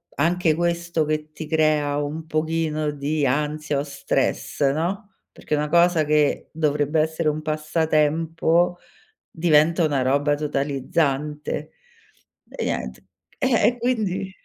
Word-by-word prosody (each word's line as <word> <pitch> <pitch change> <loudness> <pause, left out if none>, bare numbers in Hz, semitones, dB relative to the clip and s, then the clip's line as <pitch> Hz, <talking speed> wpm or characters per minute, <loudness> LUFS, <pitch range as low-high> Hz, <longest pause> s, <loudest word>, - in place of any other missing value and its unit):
anche 170 +2 +2
questo 170 -1 0
che 155 0 -3
ti 155 0 -8
crea 155 -2 +2
un 155 +2 -5
pochino 155 -1 -1
di 145 +1 -1
ansia 150 +2 -1
o - - -1
stress, 140 0 -2
no, 190 +8 -3 0.2
perché 150 - -3
una 150 0 -1
cosa 170 0 +4
che 150 -1 +1
dovrebbe 150 0 0
essere 160 +1 +1
un 150 +1 -3
passatempo, 160 +2 +1 0.5
diventa 165 +1 +3
una 145 -3 +1
roba 140 +3 +2
totalizzante. 145 0 -2 0.8
E - - -5
niente, - - -4 0.3
eh, 260 -4 +3
e 245 - +1
quindi 215 -6 -1
155 Hz, 120 wpm, -23 LUFS, 150-165 Hz, 0.8 s, cosa